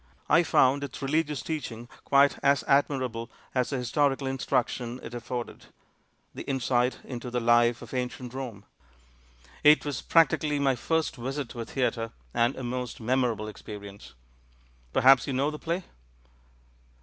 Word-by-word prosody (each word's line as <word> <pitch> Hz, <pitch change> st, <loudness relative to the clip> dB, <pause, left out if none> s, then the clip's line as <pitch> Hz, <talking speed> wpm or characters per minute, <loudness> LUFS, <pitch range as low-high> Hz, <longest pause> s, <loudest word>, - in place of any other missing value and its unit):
I 165 Hz, -, +5 dB
found 140 Hz, -4 st, +3 dB
its 140 Hz, -2 st, -6 dB
religious 150 Hz, 0 st, 0 dB
teaching 120 Hz, -7 st, -5 dB, 0.2 s
quite 140 Hz, 0 st, +4 dB
as 140 Hz, 0 st, +3 dB
admirable 130 Hz, -5 st, +1 dB, 0.2 s
as 125 Hz, -2 st, +1 dB
the 140 Hz, -, -2 dB
historical 135 Hz, +3 st, +1 dB
instruction 125 Hz, -2 st, -1 dB
it -, -, -8 dB
af 120 Hz, -, -5 dB
forded 120 Hz, -2 st, -5 dB, 0.3 s
— -, -, -42 dB
the -, -, -7 dB
insight 125 Hz, -1 st, +1 dB
into 125 Hz, -1 st, -6 dB
the 125 Hz, 0 st, -1 dB
life 120 Hz, 0 st, +3 dB
of 115 Hz, -, -11 dB
ancient 125 Hz, -1 st, -4 dB
Kome. 125 Hz, -7 st, -6 dB, 1.0 s
It 150 Hz, +1 st, +6 dB
was 140 Hz, -5 st, -3 dB
practically 155 Hz, -2 st, +3 dB
my 135 Hz, -2 st, +2 dB
first 160 Hz, +6 st, -1 dB
visit 135 Hz, +2 st, -4 dB
to 120 Hz, -, -6 dB
a -, -, -4 dB
theatre, 115 Hz, -3 st, -2 dB, 0.2 s
and 120 Hz, +3 st, +2 dB
a 130 Hz, -, -6 dB
most 125 Hz, 0 st, -4 dB
memorable 120 Hz, -2 st, 0 dB
experience. 100 Hz, -, -10 dB, 0.8 s
Perhaps 130 Hz, -, +5 dB
you 140 Hz, -, -2 dB
know 140 Hz, +4 st, +1 dB
the 150 Hz, -, -7 dB
play?" 170 Hz, +3 st, -2 dB
130 Hz, 150 wpm, -28 LUFS, 120-140 Hz, 1.0 s, It